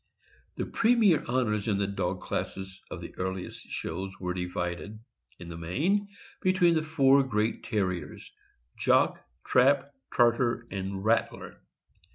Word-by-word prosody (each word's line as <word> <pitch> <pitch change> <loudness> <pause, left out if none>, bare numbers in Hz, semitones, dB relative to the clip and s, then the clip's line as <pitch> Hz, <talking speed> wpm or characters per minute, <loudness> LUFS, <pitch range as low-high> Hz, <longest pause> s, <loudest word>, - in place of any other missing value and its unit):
The - - -1
premier 225 -7 +3
honors 115 -4 0
in 105 -3 +2
the 100 - +1
dog 95 -2 -2
classes 95 0 -4
of - - -6
the - - -8
earliest 95 0 -4
shows 95 +3 -5
were 90 -1 -2
divided, 90 +2 -4 0.4
in 85 - -10
the 85 0 -7
main, 170 - 0 0.3
between 175 -4 +3
four 140 -3 +4
great 110 -4 0
Terriers 90 -8 -3 0.4
—Jock, - - +2 0.2
Trap, 140 +2 +3 0.2
Tartar, 120 0 +3
and 95 0 -4
Rattler. 115 +1 0
105 Hz, 125 wpm, -28 LUFS, 95-140 Hz, 0.4 s, four